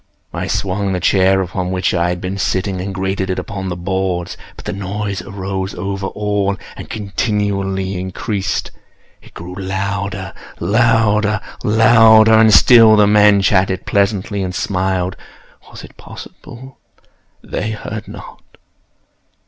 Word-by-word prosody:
I - - -3
swung 95 0 -1
the 90 - -1
chair 95 +1 +3
upon 90 0 -4
which 90 0 -1
I 85 -1 +1
had 90 0 -3
been 95 +2 -5
sitting, 95 0 -1
and 100 +1 -4
grated 95 0 -3
it 95 - -2
upon 95 -1 -5
the 90 - -3
boards, 90 0 -3 0.2
but - - -13
the - - -3
noise 100 0 -4
arose 95 0 -5
over 95 +2 -4
all 105 -1 -1 0.2
and - - -10
continually 100 -2 -2
increased. 95 +2 -3 0.5
It - - -19
grew 90 +2 -8
louder—louder—louder! 105 +3 +2
And 110 0 +6
still 115 +1 +7
the 105 -1 +5
men 105 -1 +4
chatted 95 -1 +1
pleasantly, 100 0 0
and 90 -1 -4
smiled. 95 0 -1 0.5
Was - - -11
it - - -14
possible 130 +2 -12 0.6
they 110 - -4
heard 110 0 -6
not? - - -11
100 Hz, 130 wpm, -17 LUFS, 95-105 Hz, 0.6 s, still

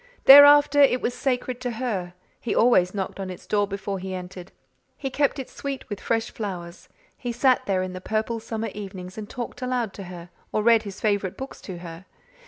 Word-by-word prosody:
Thereafter 290 +1 +9
it 260 -2 +5
was 245 - -2
sacred 255 -1 -2
to 250 - -2
her; 205 -7 -3 0.2
he 235 - -3
always 195 -6 +4
knocked 195 0 -4
on 190 -1 -4
its 180 - -9
door 205 -1 +1
before 200 0 -4
he 190 0 -5
entered; 180 0 -9 0.5
he 270 -2 -4
kept 285 +2 +1
it 270 - -5
sweet 275 -1 -6
with 205 -2 -5
fresh 225 -1 -1
flowers; 180 -5 -7 0.3
he 245 - -3
sat 255 +2 +2
there 190 -2 +1
in 185 0 -5
the 185 - -7
purple 220 +3 -2
summer 225 0 -4
evenings 190 -3 -8
and 215 -1 -7
talked 245 +1 -6
aloud 250 -4 -2
to 195 - -8
her 175 -1 -10 0.2
or 215 - 0
read 230 -1 +5
his 200 -2 -9
favourite 200 -3 -1
books 265 +1 -8
to 185 -3 -7
her. 170 +1 -10
210 Hz, 200 wpm, -24 LUFS, 185-250 Hz, 0.5 s, Thereafter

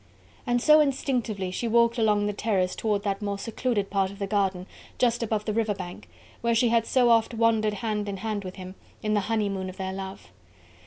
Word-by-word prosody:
And 245 0 +2
so 305 +5 +6
instinctively 245 -9 0
she 235 +5 -2
walked 235 +1 +3
along 210 -2 +3
the 205 - -1
terrace 195 -4 0
towards 210 -2 -1
that 200 0 -2
more 200 -1 -2
secluded 215 -1 -2
part 195 -1 +1
of 200 - -11
the 200 - -2
garden 195 -2 0 0.3
just 240 -1 +2
above 215 -2 -1
the 215 - -1
river 220 -2 0
bank, 180 -2 -8 0.3
where 235 0 +1
she 235 +1 +3
had 230 -1 +2
so 245 -2 +4
oft 230 0 +3
wandered 220 -2 +2
hand 210 -2 -2
in 195 - -4
hand 210 0 -3
with 185 0 -7
him, 185 0 -8 0.3
in 215 0 0
the 210 - +3
honeymoon 200 -4 -1
of 185 - -10
their 190 0 -3
love. 190 0 -8
210 Hz, 210 wpm, -26 LUFS, 195-230 Hz, 0.3 s, so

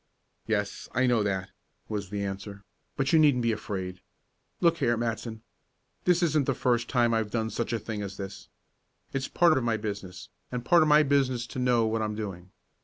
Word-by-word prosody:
"Yes, 105 -2 -2
I 130 +2 +3
know 120 -3 +3
that," 95 -2 -2 0.4
was 105 -3 -4
the 100 0 -3
answer, 100 +1 -6 0.3
"but 135 +2 0
you 160 - +7
needn't 145 -6 +4
be 115 - +2
afraid. 95 -4 -4 0.6
Look 170 -1 +3
here, 120 0 +2
Matson. 115 -1 -3 0.6
This 180 0 +3
isn't 155 -4 +2
the 135 - +1
first 120 -1 +1
time 120 -3 +3
I've 110 -2 0
done 110 0 -1
such 120 - -2
a 115 - +1
thing 110 -1 -5
as 100 -1 -6
this. 100 0 -7 0.7
It's 135 0 -1
part 170 -3 +4
of - - -4
my 115 -2 +1
business, 100 -4 -6 0.2
and 125 -1 -4
part 175 -2 +6
of 155 - +4
my 150 0 +6
business 135 -4 +1
to 130 - -7
know 125 -2 +3
what 110 0 0
I'm 105 -1 -2
doing. 95 -4 -6
115 Hz, 195 wpm, -28 LUFS, 105-130 Hz, 0.7 s, you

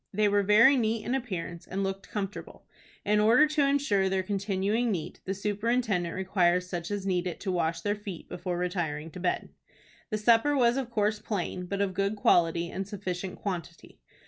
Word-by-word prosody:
They 210 +1 +2
were 205 0 +3
very 220 +7 +6
neat 225 -2 0
in 245 - -1
appearance, 185 -9 -4
and 195 +1 -2
looked 195 0 -4
comfortable. 205 -1 -6 0.4
In 210 0 +3
order 230 +8 +6
to 300 -2 +2
insure 250 -9 +2
their 190 0 0
continuing 200 +4 0
neat, 165 -6 -4
the 195 - -2
superintendent 210 -3 0
requires 180 -1 +1
such 175 -2 -4
as 205 -2 -3
need 180 -2 0
it 175 - -5
to 195 - -2
wash 165 -2 -1
their 205 +4 0
feet 205 -5 -8
before 180 0 -4
retiring 165 -4 -2
to 180 - -9
bed. 180 0 -1 0.6
The 215 - -1
supper 235 +7 +4
was 240 -2 +4
of 265 -3 -2
course 215 -2 0
plain, 180 -4 -3
but 200 +2 -2
of 195 -2 0
good 200 +2 0
quality 170 -4 +2
and 190 0 -4
sufficient 185 -2 -5
quantity. 175 -4 -6
195 Hz, 185 wpm, -28 LUFS, 180-215 Hz, 0.6 s, very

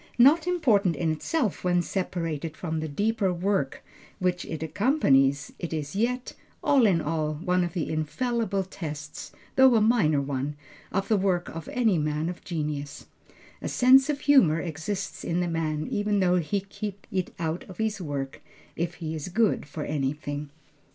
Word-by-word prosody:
Not 295 +8 +6
important 220 - +3
in 165 -2 0
itself 225 - -1
when 175 -1 +2
separated 165 -5 -3
from 160 -3 -3
the 160 - -3
deeper 205 +5 0
work 180 -5 -1 0.3
which 180 -1 0
it 160 0 -5
accompanies, 140 - +2
it 170 - -4
is 150 +1 -4
yet, 245 +4 -1 0.3
all 265 -5 +5
in 175 -5 +3
all, 155 0 -1
one 180 +3 +1
of 175 -1 -3
the 165 - -2
infallible 200 +6 -1
tests, 155 -5 -7 0.3
though 265 -2 +7
a - - +6
minor 210 -10 +3
one, 140 +1 -2 0.4
of 195 -1 -1
the 215 - +3
work 185 -2 0
of 165 -1 -7
any 225 -8 +2
man 150 +2 -1
of 180 - -7
genius. 150 -4 -4 0.6
A - - -3
sense 265 +3 +5
of 290 -1 -1
humor 190 - +5
exists 180 +5 -4
in 170 +1 -1
the 175 - 0
man 155 -2 -1
even 205 0 +1
though 180 -1 +3
he 185 +4 0
keep 200 0 -7
it 185 -2 -1
out 165 +1 -2
of 185 - -10
his 220 -3 -1
work, 140 -4 -4 0.3
if 170 +1 -2
he 160 -2 -5
is 155 0 -4
good 215 -4 +1
for 150 +1 -5
anything. 145 0 -3
175 Hz, 170 wpm, -27 LUFS, 155-205 Hz, 0.6 s, though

